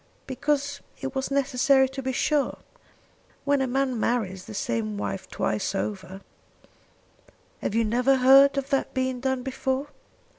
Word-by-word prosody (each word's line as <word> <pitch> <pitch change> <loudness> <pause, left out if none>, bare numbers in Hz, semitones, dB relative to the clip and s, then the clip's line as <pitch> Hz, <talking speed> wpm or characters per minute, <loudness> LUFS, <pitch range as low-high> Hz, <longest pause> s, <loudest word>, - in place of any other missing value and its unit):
"Because 285 +1 -1 0.2
it 270 -1 -5
was 265 -1 -2
necessary 270 -1 +3
to 270 0 -6
be 260 0 -2
sure. 290 +2 0 0.9
When 285 -1 +2
a 265 - +1
man 260 -1 0
marries 195 -6 -1
the 215 - -9
same 225 -4 -2
wife 190 -2 -4
twice 200 -1 -2
over 190 -1 -4 0.7
" - - -33
"Have 215 - -2
you 230 0 +3
never 250 +5 +3
heard 270 +2 +6
of 275 0 -3
that 275 - 0
being 260 -1 -1
done 265 0 -1
before? 265 +1 -2
260 Hz, 150 wpm, -26 LUFS, 230-275 Hz, 0.9 s, heard